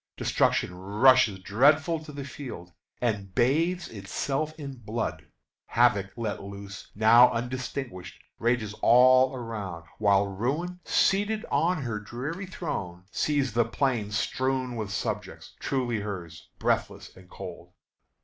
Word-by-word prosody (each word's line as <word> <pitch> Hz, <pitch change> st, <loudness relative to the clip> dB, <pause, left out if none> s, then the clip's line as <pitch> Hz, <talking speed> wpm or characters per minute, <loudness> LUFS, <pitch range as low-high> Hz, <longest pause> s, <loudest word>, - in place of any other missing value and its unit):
Destruction -, -, +1 dB
rushes 105 Hz, +4 st, +4 dB
dreadful 150 Hz, -, +3 dB
to 150 Hz, -, -9 dB
the 140 Hz, -1 st, -6 dB
field 120 Hz, -, -8 dB, 0.3 s
And 100 Hz, -6 st, -2 dB
bathes 165 Hz, +8 st, +2 dB
itself 135 Hz, +9 st, -3 dB
in 140 Hz, -4 st, -7 dB
blood: 110 Hz, -7 st, -4 dB, 0.4 s
havoc 115 Hz, -5 st, +3 dB
let 115 Hz, -3 st, -3 dB
loose, 100 Hz, 0 st, -9 dB
Now 115 Hz, +4 st, +7 dB
undistinguish'd, 125 Hz, -6 st, -4 dB, 0.2 s
rages 115 Hz, -3 st, 0 dB
all 130 Hz, +2 st, +6 dB
around; 105 Hz, -9 st, -6 dB
While 100 Hz, -1 st, +4 dB
Ruin, 140 Hz, -, -2 dB
seated 205 Hz, +3 st, +2 dB
on 155 Hz, +2 st, +1 dB
her 115 Hz, -4 st, -3 dB
dreary 135 Hz, -, -5 dB
throne, 90 Hz, -, -5 dB
Sees 140 Hz, -5 st, 0 dB
the 120 Hz, +1 st, +4 dB
plain 115 Hz, -2 st, -1 dB
strewed 130 Hz, +4 st, -1 dB
with 110 Hz, -3 st, -4 dB
subjects, -, -, -4 dB
truly 125 Hz, -4 st, -1 dB
hers, 90 Hz, -7 st, -7 dB
Breathless -, -, -1 dB
and 90 Hz, -1 st, -16 dB
cold." -, -, -9 dB
120 Hz, 120 wpm, -27 LUFS, 100-140 Hz, 0.4 s, Now